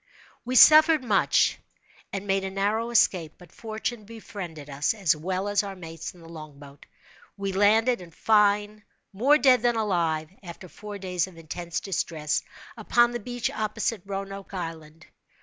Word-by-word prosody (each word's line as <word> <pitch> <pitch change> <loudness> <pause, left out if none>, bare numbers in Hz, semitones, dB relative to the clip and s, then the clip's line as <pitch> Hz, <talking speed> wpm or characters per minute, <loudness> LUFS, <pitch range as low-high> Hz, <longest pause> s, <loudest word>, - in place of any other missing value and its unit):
We 250 +1 -4
suffered 310 +1 +7
much, 210 -5 +2 0.5
and 195 0 -5
made 195 -1 0
a 190 - -3
narrow 205 +4 -1
escape; 180 -8 +2
but 180 - -17
fortune 220 0 -5
befriended 195 -8 -9
us, 145 +8 -1
as 190 -7 +2
well 185 +5 -3
as 205 -1 +2
our 200 -2 -7
mates 165 -1 -8
in 175 - -17
the 165 - -14
long 155 -3 -11
boat. 140 0 -15 0.5
We 195 -1 -3
landed, 220 +3 +3
in 175 - -11
fine, 210 +2 +1 0.3
more 265 +9 +4
dead 255 -3 +4
than 240 0 +2
alive, 170 -7 -1
after 180 0 -10
four 205 +3 -9
days 180 -2 -2
of 180 -3 -15
intense 165 +1 -5
distress, 160 -5 -2 0.3
upon 240 0 +2
the 240 - -4
beach 245 +1 -3
opposite 215 -1 -2
Roanoke 195 0 -6
Island. 165 -2 -7
195 Hz, 160 wpm, -26 LUFS, 170-220 Hz, 0.5 s, suffered